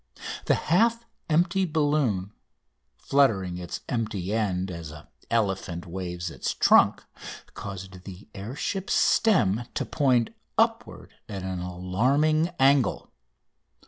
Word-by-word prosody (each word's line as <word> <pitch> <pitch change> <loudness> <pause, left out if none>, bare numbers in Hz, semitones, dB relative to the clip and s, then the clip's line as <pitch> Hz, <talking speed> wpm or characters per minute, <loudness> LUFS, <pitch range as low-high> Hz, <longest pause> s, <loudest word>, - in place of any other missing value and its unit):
The - - +3
half 230 +7 +2 0.2
empty 175 +4 +2
balloon, 145 - 0 0.6
fluttering 95 -11 +1
its 90 - -6
empty 110 -5 -2
end 95 -4 -1
as 85 -2 -7
an 75 -1 -11 0.2
elephant 95 -6 -1
waves 90 -1 -5
his - - -3
trunk, - - +4 0.5
caused 95 -2 -8
the 95 +1 -10
air 105 +6 -7
ship's 195 +5 -2
stem 120 - +3
to - - -1
point 125 -6 +2 0.3
upward - - 0 0.2
at 100 -3 -5
an 95 -1 -3
alarming 125 - +1
angle. 135 0 +3
105 Hz, 110 wpm, -26 LUFS, 90-145 Hz, 0.6 s, trunk